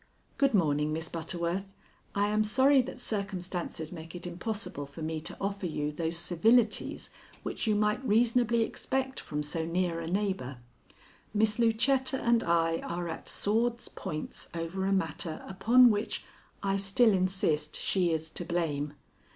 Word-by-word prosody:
Good 275 -4 +4
morning, 150 -4 +2
Miss 160 +1 -3
Butterworth. 175 +3 -2 0.4
I 205 +1 +2
am 215 +1 +2
sorry 265 +5 +5
that 250 0 -7
circumstances 185 -7 -3
make 165 -1 -9
it 175 - -6
impossible 180 -4 -4
for 150 +3 -8
me 160 0 -2
to 165 - -6
offer 200 -1 -2
you 150 -2 -2
those 165 +2 -2
civilities 215 +7 +2 0.3
which - - -3
you 215 - +3
might 210 +4 +1
reasonably 235 0 +3
expect 265 +3 -2
from 150 0 -4
so 160 +2 -2
near 170 0 0
a 165 - -5
neighbor. 185 -9 -1 0.8
Miss 215 +1 +3
Lucetta 260 +4 +2
and 235 -1 +3
I 165 -1 +2
are 175 0 -4
at 160 - -6
swords' 235 +3 0
points 155 0 -5
over 170 +3 -2
a - - +1
matter 165 -3 -1
upon 230 +6 +6
which 205 0 -2 0.4
I 195 0 +1
still 200 +3 +4
insist 185 -5 +1
she 180 -3 +1
is 160 0 -2
to - - -3
blame. 155 -4 -1
190 Hz, 150 wpm, -30 LUFS, 165-220 Hz, 0.8 s, upon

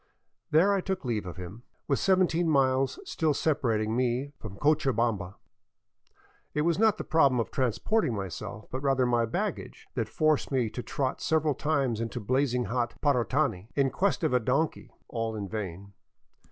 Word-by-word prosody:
There 180 +7 +4
I 195 - +1
took 190 -5 -3
leave 110 -6 -2
of 90 - -7
him, 95 +5 -8 0.3
with 140 - +1
seventeen 175 -3 +2
miles 135 - +2
still 160 - 0
separating 115 -9 0
me 125 +3 0
from 100 -3 -8
Cochabamba. 120 -10 +1 1.2
It 150 - +2
was 170 +2 +1
not 220 -1 +4
the - - -4
problem 140 -6 +3
of 115 - -2
transporting 130 - 0
myself, 100 +2 -6
but 130 - -3
rather 135 -2 +2
my 120 -1 +2
baggage, - - -4
that - - -2
forced 155 -2 +1
me 125 -5 +1
to 125 - -5
trot 130 +1 -2
several 155 -2 +2
times 135 -6 0
into 115 +2 -3
blazing 125 +2 +1
hot 120 +3 -2
Parotani 125 -6 +1
in 135 -2 +2
quest 195 -2 0
of 155 - +1
a 125 - +4
donkey 140 +7 -1
— - - -39
all 115 -1 -3
in 100 -2 -4
vain. 100 -1 -6
130 Hz, 165 wpm, -28 LUFS, 115-155 Hz, 1.2 s, There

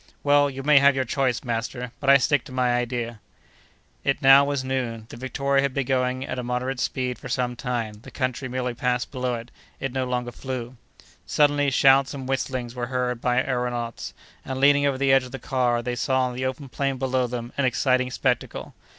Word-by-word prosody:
"Well, 145 0 +4
you 135 0 -7
may 150 0 +6
have 140 0 +5
your 135 - +1
choice, 130 0 0
master, 120 +1 -3
but 135 - 0
I 140 - +9
stick 145 +2 +1
to - - -11
my 125 -1 +1
idea." 120 -2 -2 0.8
It - - +1
now 135 +1 +8
was 140 -1 -1
noon. 125 -4 -3
The - - -9
Victoria 135 +2 0
had 140 -2 -1
been 140 -2 0
going 130 0 0
at 130 - -4
a - - -3
more 125 +1 -2
moderate 130 +1 -2
speed 125 -1 -2
for 130 - -8
some 125 0 -1
time; 120 -3 -3
the - - -12
country 130 0 -3
merely 125 -1 -2
passed 125 0 -1
below 125 -2 -2
it; 115 +1 -8 0.3
it 135 -1 -3
no 130 -1 -1
longer 125 -1 -2
flew. 130 -1 -6 0.5
Suddenly, 145 -1 +3
shouts 135 +1 +4
and 135 -2 -6
whistlings 130 -2 -2
were 120 -1 -4
heard 125 -1 -2
by 125 +1 +2
our 125 -2 -1
aëronauts, 120 -1 -5 0.3
and, 130 0 -4
leaning 145 +1 +5
over 135 -2 0
the 135 0 +2
edge 135 -1 +5
of 125 - -11
the - - -3
car, 120 -2 0
they 125 0 -2
saw 130 +1 +1
on 125 -1 -1
the 130 +1 -2
open 135 +2 -5
plain 135 +1 -2
below 130 -1 0
them 120 0 -6
an 140 - +1
exciting 130 0 +2
spectacle. 125 -1 -2
130 Hz, 215 wpm, -24 LUFS, 125-135 Hz, 0.8 s, I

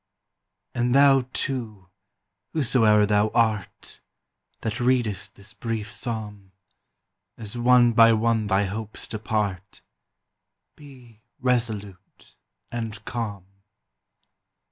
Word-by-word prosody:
And 120 +1 0
thou, 135 -2 +5
too, 110 -11 -3 0.6
whosoe'er 115 -7 +3
thou 105 +1 +2
art, 110 -4 -1 0.6
That 110 +2 -3
readest 120 -6 0
this 100 +1 -9
brief 115 -2 -4
psalm, 105 -5 -5 0.8
As 110 0 -7
one 120 0 +4
by 115 0 +7
one 110 -1 +1
thy 100 0 +2
hopes 105 +2 -6
depart, 105 -3 -3 0.9
Be 125 -6 -16 0.2
resolute 110 -7 -3 0.4
and 115 -2 -5
calm. 105 -6 -4
110 Hz, 90 wpm, -24 LUFS, 105-120 Hz, 0.9 s, by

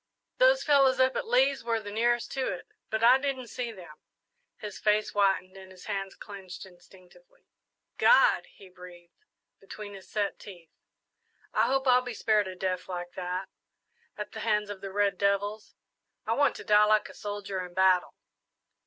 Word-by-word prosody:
Those - - +5
fellows 275 -3 +4
up 260 0 +3
at - - -3
Lee's 265 +3 +2
were 230 -1 0
the 205 -1 -8
nearest 240 +2 0
to 265 -1 -2
it, 180 - -7 0.2
but 220 +1 -2
I 250 +3 +7
didn't 265 -3 -3
see 245 -2 -4
them." 185 -5 -13 0.6
His 210 -3 -8
face 210 0 +1
whitened 195 -2 +1
and 190 -1 -12
his 185 -1 -14
hands 195 -2 -4
clenched 195 -3 -10
instinctively. 190 - -20 0.5
"God!" - - +5
he 195 - -17
breathed, 180 - -15 0.3
between 205 +1 -9
his 195 -1 -12
set 205 -1 -2
teeth, 175 -5 -13 0.8
"I - - +3
hope 270 0 0
I'll 250 0 +5
be 245 -2 -7
spared 215 -3 +1
a 185 - -7
death 185 0 -3
like 175 -1 -5
that, 180 +1 -4 0.7
at - - -6
the - - -8
hands 210 -2 0
of 195 -2 -9
the 195 -1 -6
red 205 0 0
devils. 200 +2 -1 0.5
I 225 - 0
want 285 +4 +2
to - - -8
die 210 0 +5
like 215 0 +2
a - - -13
soldier 205 -2 -5
in 175 -1 -11
battle!" 185 -1 +3
205 Hz, 175 wpm, -28 LUFS, 190-240 Hz, 0.8 s, I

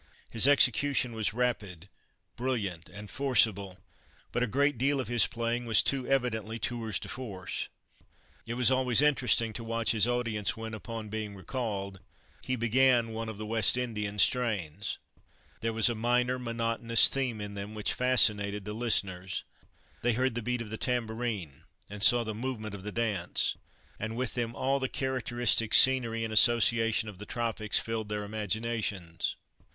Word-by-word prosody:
His 115 +3 +4
execution 135 -2 +3
was 110 -2 -1
rapid, 105 -7 -3 0.5
brilliant, 105 -10 -3
and 105 +3 -10
forcible, 100 -7 +2 0.5
but 120 - -1
a 125 - +1
great 140 +2 0
deal 140 +2 +1
of 125 -4 -4
his 120 -1 +5
playing 120 +1 -3
was 110 -3 +4
too 135 -2 0
evidently 115 -5 -1
tours 115 -4 -2
de - - -7
force. 100 -8 -5 0.8
It 120 - -4
was 125 +1 +2
always 130 0 +3
interesting 125 -6 +2
to 115 - -6
watch 115 -1 0
his 110 0 +2
audience, 115 -4 -1
when, 110 0 -7
upon 110 0 -7
being 105 -1 -5
recalled, 100 -3 -5 0.4
he 130 - -2
began 120 0 +3
one 110 0 -5
of 110 - -7
the 110 - -6
West 115 +2 +3
Indian 105 -4 -3
strains. 105 -7 0 0.6
There 115 - -2
was 115 +1 +2
a 120 - +1
minor 125 +3 0
monotonous 115 -1 +4
theme 125 -5 -2
in 105 0 -6
them 100 +2 -7
which 105 - -1
fascinated 105 -5 +3
the 105 - -5
listeners. 95 -5 -1 0.6
They 120 0 +2
heard 130 +2 0
the 120 - -3
beat 125 +1 -2
of 105 - -11
the 110 - -4
tambourine, 110 - -3 0.3
and 105 0 -8
saw 120 +4 +6
the 110 -1 -4
movement 110 -2 -5
of 100 - -7
the 105 +2 -6
dance, 105 -6 -1 0.4
and 110 +2 -4
with 130 -1 -2
them 120 -1 -3
all 135 +1 0
the 130 -1 -2
characteristic 120 -4 +1
scenery 120 -4 +4
and 110 -1 -4
association 115 -1 +4
of 100 -3 -9
the 105 - -9
tropics 115 -3 -1
filled 110 -2 -3
their 105 0 -3
imaginations. 105 -4 -3
115 Hz, 165 wpm, -29 LUFS, 105-125 Hz, 0.8 s, saw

